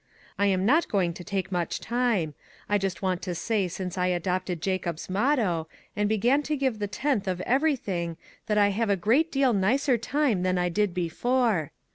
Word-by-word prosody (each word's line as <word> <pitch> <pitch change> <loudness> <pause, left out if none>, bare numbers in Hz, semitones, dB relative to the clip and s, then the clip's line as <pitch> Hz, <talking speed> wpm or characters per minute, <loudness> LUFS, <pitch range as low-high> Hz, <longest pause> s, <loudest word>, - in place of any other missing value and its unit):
I 200 - +3
am 190 -1 +1
not 300 +9 +4
going 180 -4 +1
to 180 - -9
take 195 -1 -3
much 175 -2 -1
time; 235 -10 0 0.3
I 205 0 +2
just 195 -1 -3
want 185 -2 0
to 180 - -4
say 205 +1 0
since 180 +1 -5
I 180 - +2
adopted 180 0 -1
Jacob's 175 -1 -3
motto, 200 - +1 0.3
and 205 0 +1
began 240 +7 +3
to 300 0 -2
give 260 -5 0
the 205 - -1
tenth 210 +1 -1
of 185 -1 -1
every 280 +8 +2
thing, 170 -8 -4 0.3
that 210 -1 +1
I 205 -1 +5
have 215 +2 -1
a 200 - +4
great 245 - +2
deal 270 -3 +3
nicer 240 +6 +2
time 250 -4 +1
than 185 0 +1
I 180 0 +1
did 205 0 0
before. 190 - 0
200 Hz, 195 wpm, -27 LUFS, 180-240 Hz, 0.3 s, I